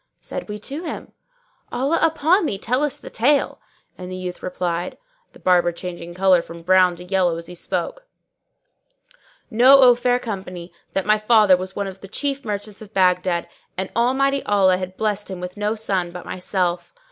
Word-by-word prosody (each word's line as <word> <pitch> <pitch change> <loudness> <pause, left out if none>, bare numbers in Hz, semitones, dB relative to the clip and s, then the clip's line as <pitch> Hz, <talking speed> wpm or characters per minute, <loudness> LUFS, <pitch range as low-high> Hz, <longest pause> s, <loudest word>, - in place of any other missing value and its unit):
Said - - -7
we 210 - -4
to 275 +9 -6
him, 340 - -6 0.6
"Allah 275 +6 0
upon 325 +3 +3
thee, 200 - -2
tell 250 +6 -1
us 295 -3 -1
the - - -11
tale;" 275 +6 +1 0.4
and 180 0 -7
the - - -4
youth 180 -1 -6
replied 180 -1 -3 0.4
(the - - -15
Barber 175 -1 +3
changing 175 0 -8
colour 185 -1 +4
from 170 0 -11
brown 185 0 +4
to 175 - -10
yellow 180 -2 +1
as 165 - -7
he 180 - -9
spoke): - - -4 1.4
Know, 255 +5 +7
O 255 -2 +8
fair 245 +1 +1
company, 185 -7 -7 0.2
that 195 - -1
my 215 0 +3
father 215 -3 +5
was 185 +1 -6
one 200 - -2
of 190 -1 -8
the 195 - -9
chief 275 +6 -2
merchants 210 -1 -5
of 215 0 -13
Baghdad, 180 -2 +2 0.3
and 190 0 -3
Almighty 270 +3 +2
Allah 190 -3 +3
had 185 0 -6
blessed 210 -2 -1
him 190 -2 -6
with 180 0 -6
no 210 +1 -1
son 195 -5 -1
but 175 0 -9
myself. 180 - -2
195 Hz, 180 wpm, -21 LUFS, 180-240 Hz, 1.4 s, O